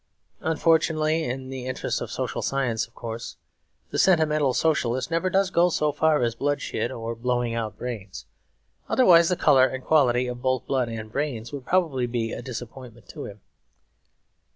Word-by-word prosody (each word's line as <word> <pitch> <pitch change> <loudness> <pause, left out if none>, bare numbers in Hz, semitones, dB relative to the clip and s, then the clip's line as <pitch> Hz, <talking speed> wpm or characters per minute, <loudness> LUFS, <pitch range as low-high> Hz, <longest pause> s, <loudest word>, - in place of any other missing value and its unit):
Unfortunately 160 0 +1
(in 130 +1 -4
the 130 -1 -6
interests 130 - -2
of - - -4
social - - -3
science, 125 -5 -1
of 120 - -33
course) 115 0 -7 0.5
the - - -1
sentimental 155 -6 +3
socialist 130 -2 0
never 170 +3 +1
does 190 0 +1
go 175 0 +4
so 150 -3 +1
far 150 -1 +2
as 115 -1 +1
bloodshed 140 -1 -2
or 115 0 -4
blowing 120 0 -1
out 110 -3 -3
brains; 100 -6 -6 0.6
otherwise 170 -10 +6
the 180 - +2
colour 135 -6 +5
and 130 -1 -6
quality 125 -5 +3
of 125 0 -5
both 130 -1 0
blood 130 -3 0
and 110 -1 -6
brains 120 -4 -3
would 135 -3 -7
probably 155 -9 +1
be 115 -1 -2
a - - -5
disappointment 120 -1 -9
to - - -7
him. 105 0 -10
130 Hz, 165 wpm, -25 LUFS, 120-155 Hz, 0.6 s, otherwise